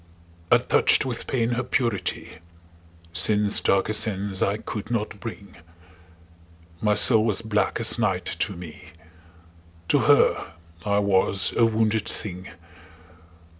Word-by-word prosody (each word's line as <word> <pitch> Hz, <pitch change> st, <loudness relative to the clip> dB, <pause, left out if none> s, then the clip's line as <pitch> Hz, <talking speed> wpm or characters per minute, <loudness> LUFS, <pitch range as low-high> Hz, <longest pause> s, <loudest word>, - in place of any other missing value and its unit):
I -, -, +8 dB
touched -, -, +2 dB
with 125 Hz, -3 st, -5 dB
pain 120 Hz, -3 st, -1 dB
her 120 Hz, +1 st, -1 dB
purity; 115 Hz, -9 st, -2 dB, 0.7 s
Sin's 105 Hz, +3 st, +2 dB
darker 100 Hz, +2 st, +1 dB
sense 100 Hz, -3 st, -1 dB
I 100 Hz, +1 st, +1 dB
could 105 Hz, 0 st, -7 dB
not 110 Hz, -3 st, -3 dB
bring: 100 Hz, -5 st, -9 dB, 1.2 s
My 105 Hz, -1 st, +2 dB
soul 110 Hz, +1 st, +6 dB
was 110 Hz, 0 st, 0 dB
black 105 Hz, 0 st, -1 dB
as 115 Hz, 0 st, 0 dB
night 95 Hz, -5 st, 0 dB
to 100 Hz, -, -2 dB
me: 85 Hz, -3 st, -11 dB, 1.0 s
To -, -, +3 dB
her -, -, +2 dB, 0.3 s
I 100 Hz, -1 st, 0 dB
was 100 Hz, -1 st, +1 dB
a 115 Hz, -, +4 dB
wounded 110 Hz, -1 st, 0 dB
thing. 95 Hz, -2 st, -6 dB
105 Hz, 125 wpm, -24 LUFS, 100-115 Hz, 1.2 s, I